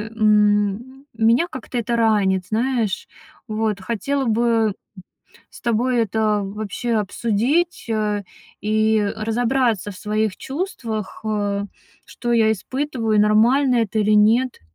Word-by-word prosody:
м, 210 +4 +1
меня 230 +7 +3
как-то 255 -1 -6
это 235 0 -1
ранит, 200 -5 +2
знаешь. 225 -2 -1 0.4
Вот, 215 -2 -1
хотела 260 +7 -2
бы, 230 0 +1
м, 225 -3 +2 0.8
с - - -14
тобой 240 +1 +1
это 215 -1 +1
вообще 215 +4 -3
обсудить, 235 - 0
а, 210 -2 0 0.4
и 215 +1 +2 0.2
разобраться 225 -1 0
в 195 - -10
своих 215 -1 -1
чувствах: 250 - -5
а, 205 -2 -1 0.4
что 240 -1 -4
я 220 -2 +4
испытываю, 235 -1 -2
нормально 240 +5 +4
это 220 -2 0
или 215 0 +2
нет. 225 +5 +3
220 Hz, 120 wpm, -21 LUFS, 210-240 Hz, 0.8 s, я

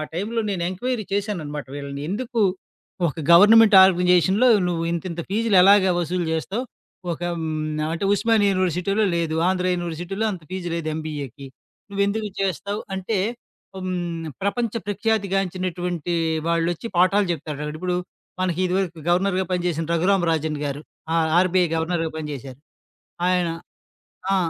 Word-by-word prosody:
టైంలో 210 +7 -2
నేను 185 -3 -2
ఎంక్వైరీ 225 +4 -3
చేశాననమాట 175 -8 -3
వీళ్ళని 140 0 -6
ఎందుకు, 230 +3 -2 0.7
ఒక 145 - -5 0.2
గవర్నమెంట్ 210 +4 +8
ఆర్గనైజేషన్‌లో 185 +5 +4 0.2
నువ్వింతింత 170 0 -2
ఫీజులెలాగ 200 -2 +5
వసూలు 175 0 -1
జేస్తావు? 195 +9 -2 0.5
ఒక 165 - -7 0.2
హ్మ్, 160 -1 -3 0.4
అంటే 170 +4 -3
ఉస్మానియ 215 0 +2
యూనివర్సిటీలో 185 +3 +1
లేదు. 165 -2 -1
ఆంధ్ర 185 -1 -1
యూనివర్సిటీలో 175 +4 -3
అంత 180 -4 -8
ఫీజ్ 185 -1 -5
లేదు 165 -2 -3
ఎంబీఏకి. 145 -4 -6 0.4
నువ్వెందుకు 200 +2 0
చేస్తావు? 200 +2 -2
అంటే, 190 +3 -2 0.6
హ్మ్. 175 -3 -3 0.2
ప్రపంచ 215 +3 -1
ప్రఖ్యాతి 205 0 0
గాంచినటువంటి 180 -3 -2 0.3
వాళ్ళొచ్చి 170 +4 0
పాఠాలు 190 +3 +4
చెప్తారు. 150 -2 -5
ఇప్పుడు 180 +2 -2 0.4
మనకి 185 -2 0
ఇదివరకు 180 -2 -1
గవర్నర్‌గా 185 +2 +2
పనిచేసిన 175 -2 -1
'రఘురామ్ 180 +2 +2
రాజన్' 155 -2 -1
గారు. 140 0 -3 0.3
ఆ - - +1 0.2
ఆర్‌బిఐ 185 0 +3
గవర్నర్‌గా 165 0 -1
పని 155 -1 -5
జేశారు. 135 -1 -8 0.7
ఆయన. 180 -1 +2 0.8
ఆ! - - +4
180 Hz, 120 wpm, -23 LUFS, 165-200 Hz, 0.8 s, గవర్నమెంట్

